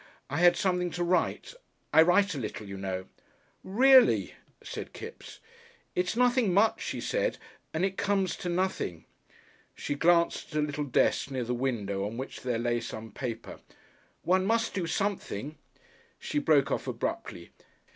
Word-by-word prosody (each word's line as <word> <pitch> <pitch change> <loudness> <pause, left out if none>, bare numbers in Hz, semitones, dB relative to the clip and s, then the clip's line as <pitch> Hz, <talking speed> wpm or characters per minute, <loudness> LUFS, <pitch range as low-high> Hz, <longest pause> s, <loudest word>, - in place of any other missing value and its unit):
I 145 - -1
had 175 0 +6
something 180 -1 +1
to 175 - 0
write. 180 - 0 0.4
I - - +8
write 190 +4 +4
a 145 - -4
little, 105 -3 -5
you 100 - -6
know." 95 -1 -4 0.6
"Reely!" 255 +6 +5 0.3
said - - -7
Kipps. 460 - -10 0.5
"It's 180 +3 0
nothing 245 -4 +3
much," 215 +3 +3
she - - -4
said, - - -1 0.3
"and 160 +4 0
it 195 0 -3
comes 195 -3 0
to 180 - -4
nothing." 175 - -2 0.7
She - - -3
glanced 170 +1 +2
at - - +2
a - - +2
little 145 0 -3
desk 135 0 +1
near 130 -2 -2
the 120 +1 -2
window, 110 -6 -2
on 110 +3 -7
which 130 +2 -6
there 125 -2 -1
lay 120 0 0
some 110 -1 -7
paper. 120 -3 -6 0.6
"One 185 +1 +3
must 225 0 +1
do 180 -4 -2
something." 165 - -2 0.6
She 295 - -2
broke 150 - +3
off - - -2
abruptly. 85 -1 -4
170 Hz, 155 wpm, -29 LUFS, 120-195 Hz, 0.7 s, I